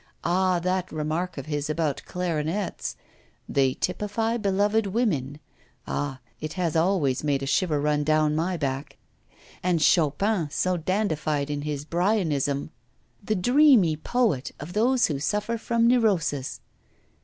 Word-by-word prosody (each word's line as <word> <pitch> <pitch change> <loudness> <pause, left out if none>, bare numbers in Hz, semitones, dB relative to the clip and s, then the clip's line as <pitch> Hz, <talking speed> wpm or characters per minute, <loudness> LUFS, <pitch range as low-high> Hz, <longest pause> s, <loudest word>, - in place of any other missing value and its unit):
Ah! 185 +1 +2
that 185 +1 -1
remark 160 +3 -2
of 140 - -5
his 150 -1 -3
about 155 -3 -1
clarionets: 175 +2 -2 0.5
"They 135 -2 +2
typify 210 +5 -1
beloved 205 +1 +1
women." 160 - -1 0.5
Ah! 135 -3 -3 0.2
it 155 0 -5
has 175 -4 -1
always 160 -7 +1
made 140 -2 0
a - - -1
shiver 155 +1 +1
run 150 0 +1
down 155 0 +2
my 175 +3 0
back. 140 -1 -3 0.6
And 180 -2 +1
Chopin, 165 +3 +2
so 180 +5 0
dandified 160 -5 -1
in 145 0 -2
his 145 -1 -4
Byronism; 160 -6 0 0.5
the 215 +2 0
dreamy 245 - +5
poet 165 - 0
of 155 +5 -8
those 240 +4 +3
who 145 -4 -2
suffer 210 +9 -1
from 230 0 +1
neurosis! 180 - +1
165 Hz, 130 wpm, -25 LUFS, 150-200 Hz, 0.6 s, dreamy